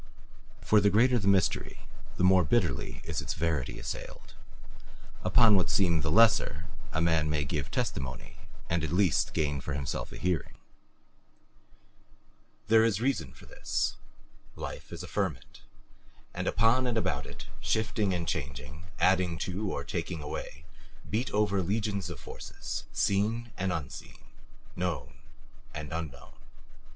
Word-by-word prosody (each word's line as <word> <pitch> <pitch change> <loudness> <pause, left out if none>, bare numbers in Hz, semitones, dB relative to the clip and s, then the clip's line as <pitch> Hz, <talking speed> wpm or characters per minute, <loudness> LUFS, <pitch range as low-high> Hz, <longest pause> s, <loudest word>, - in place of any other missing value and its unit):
For 105 -1 +4
the 100 - +5
greater 120 +5 +4
the 100 - -2
mystery, 95 -3 +2 0.4
the - - 0
more 90 0 +6
bitterly 70 - 0
is - - -3
its - - -3
verity 80 -5 -1
assailed; - - -7 0.9
upon 115 -3 +6
what 95 - +3
seem 85 -5 +3
the 80 - 0
lesser 85 -5 +4 0.3
a 80 - -1
man 80 -2 +2
may 75 -1 0
give 70 -1 -2
testimony 65 -2 -3 0.3
and 85 -1 0
at 80 - -2
least 90 -1 +2
gain 75 -2 0
for 70 +2 -4
himself 70 -1 -3
a - - -8
hearing. 90 -2 -1 2.1
There 110 0 +6
is 115 -3 +2
reason 125 - 0
for - - -15
this. - - -2 0.6
Life - - -7
is - - -6
a - - -7
ferment, - - -3 0.7
and - - -3
upon 115 +4 +3
and 120 -2 0
about 85 -11 -1
it, - - -9
shifting 110 -2 0
and 85 -2 -2
changing, 80 +6 -4
adding 95 -3 +3
to 95 +2 -2
or - - -3
taking 80 -4 -4
away, 75 +1 -6 0.4
beat 115 +5 -1
over 105 -2 +2
legions 100 0 -1
of 85 -7 -7
forces, 60 0 -6
seen 110 +4 +1
and 95 0 -1
unseen, 75 -7 -5 0.6
known 85 -6 -3 0.6
and 75 +1 -5
unknown. 80 -6 -6
90 Hz, 140 wpm, -30 LUFS, 75-105 Hz, 2.1 s, more